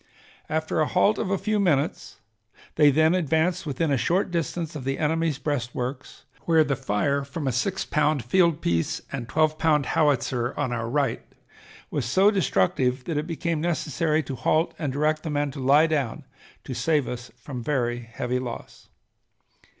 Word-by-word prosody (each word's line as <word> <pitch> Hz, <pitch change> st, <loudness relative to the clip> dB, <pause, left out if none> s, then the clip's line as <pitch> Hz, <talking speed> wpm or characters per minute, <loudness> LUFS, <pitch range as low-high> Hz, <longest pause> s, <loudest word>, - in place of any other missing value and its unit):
After 160 Hz, +1 st, -1 dB
a 155 Hz, -, +2 dB
halt 200 Hz, +3 st, +2 dB
of -, -, -2 dB
a 195 Hz, -, +1 dB
few 210 Hz, +2 st, 0 dB
minutes 160 Hz, -6 st, 0 dB, 0.6 s
they 150 Hz, -1 st, +5 dB
then 155 Hz, +4 st, +4 dB
advanced 170 Hz, +1 st, +1 dB
within 145 Hz, +2 st, -1 dB
a 140 Hz, -, +3 dB
short 175 Hz, -, +1 dB
distance 170 Hz, -1 st, -2 dB
of 145 Hz, -, -5 dB
the 135 Hz, +1 st, -2 dB
enemy's 160 Hz, -1 st, 0 dB
breastworks 125 Hz, -2 st, -4 dB, 0.2 s
where 165 Hz, -2 st, +5 dB
the 145 Hz, -2 st, -1 dB
fire 140 Hz, +6 st, 0 dB
from 140 Hz, +2 st, -6 dB
a -, -, +2 dB
six 160 Hz, +11 st, -1 dB
pound 150 Hz, -3 st, +1 dB
field 170 Hz, +2 st, +3 dB
piece 85 Hz, -1 st, 0 dB
and 120 Hz, -4 st, -5 dB
twelve 155 Hz, +3 st, +1 dB
pound 150 Hz, -3 st, +3 dB
howitzer 130 Hz, -4 st, +1 dB
on 130 Hz, -4 st, -1 dB
our 115 Hz, -1 st, -3 dB
right 140 Hz, -2 st, 0 dB, 0.7 s
was 140 Hz, -5 st, -1 dB
so 190 Hz, -, +4 dB
destructive 125 Hz, -, +1 dB
that 155 Hz, +2 st, -3 dB
it 150 Hz, +2 st, -2 dB
became 165 Hz, -1 st, -2 dB
necessary 160 Hz, -1 st, 0 dB
to 135 Hz, -, -6 dB
halt 155 Hz, +6 st, +1 dB
and 150 Hz, -5 st, -2 dB
direct 155 Hz, +3 st, 0 dB
the 160 Hz, -, -5 dB
men 145 Hz, -1 st, -1 dB
to 140 Hz, -, -8 dB
lie 140 Hz, +4 st, +5 dB
down 145 Hz, -8 st, -2 dB, 0.4 s
to 130 Hz, -, -6 dB
save 145 Hz, +4 st, +1 dB
us 120 Hz, 0 st, -6 dB
from 125 Hz, +1 st, -7 dB
very 120 Hz, -2 st, -1 dB
heavy 120 Hz, +2 st, -3 dB
loss. 125 Hz, -2 st, -8 dB
150 Hz, 175 wpm, -25 LUFS, 125-160 Hz, 0.7 s, they